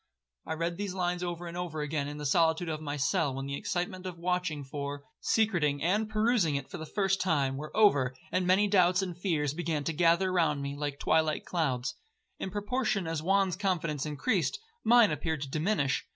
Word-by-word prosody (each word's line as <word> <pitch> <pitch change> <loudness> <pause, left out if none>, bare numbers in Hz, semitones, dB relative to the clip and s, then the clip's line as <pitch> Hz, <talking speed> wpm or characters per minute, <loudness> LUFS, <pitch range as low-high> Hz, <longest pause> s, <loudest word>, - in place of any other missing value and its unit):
'I - - -1
read 170 +1 -2
these 200 -2 -3
lines 180 -1 -1
over 175 -1 -4
and 170 0 -7
over 175 -4 -3
again 150 -1 -2
in 145 0 -6
the 150 - -6
solitude 165 +3 +2
of 155 -1 -3
my 145 -1 -4
cell, 145 -1 +1
when 135 0 -4
the 140 0 -3
excitement 180 +4 -3
of 180 -2 -6
watching 180 -4 -1
for, 140 +1 -5 0.2
secreting, 170 -11 +1
and 210 +5 +1
perusing 215 - +2
it 140 -1 -3
for 190 - -8
the 160 - -6
first 195 +1 0
time, 145 -7 +1
were 150 +3 -6
over, 140 -12 +4 0.2
and 185 -1 +1
many 190 +3 +4
doubts 185 -1 +4
and 180 -2 -4
fears 150 -7 0
began 160 -3 -2
to 165 - -2
gather 170 +3 +3
round 165 -5 +2
me 140 0 -4
like 145 -1 -3
twilight 155 +1 +1
clouds. 135 -7 -1 0.5
In - - -3
proportion 210 0 -1
as 165 -1 -2
Juan's 190 +1 +2
confidence 165 -7 -1
increased, 150 - 0 0.3
mine 235 -2 +6
appeared 150 0 -2
to - - -5
diminish. 155 -4 0
170 Hz, 195 wpm, -30 LUFS, 150-185 Hz, 0.5 s, mine